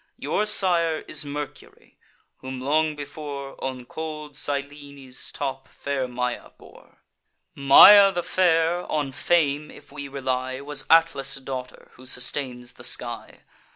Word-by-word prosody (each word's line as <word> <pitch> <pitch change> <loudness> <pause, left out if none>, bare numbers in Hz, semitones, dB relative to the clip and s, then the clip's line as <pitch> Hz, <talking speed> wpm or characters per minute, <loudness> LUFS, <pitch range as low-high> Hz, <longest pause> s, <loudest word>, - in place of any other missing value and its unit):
Your 210 - -1
sire 170 -6 +3
is 150 -1 -1
Mercury, 145 0 -9 0.4
whom 130 0 -7
long 155 +3 +1
before 145 -1 -7
On 130 -2 -5
cold 150 +1 -7
Cyllene's 140 -2 -4
top 135 -2 -5
fair 140 -2 -4
Maia 125 0 -4
bore. - - -19 0.5
Maia 195 +9 +8
the 175 -2 -3
fair, 175 -1 +1
on 145 -3 -1
fame 150 0 0
if - - -15
we 140 -1 -7
rely, 130 -1 -3
Was 145 +1 -2
Atlas' 165 -4 +3
daughter, 130 -2 -8
who 130 +1 -12
sustains 125 -1 -4
the - - -14
sky. - - -3
140 Hz, 125 wpm, -24 LUFS, 130-155 Hz, 0.5 s, Maia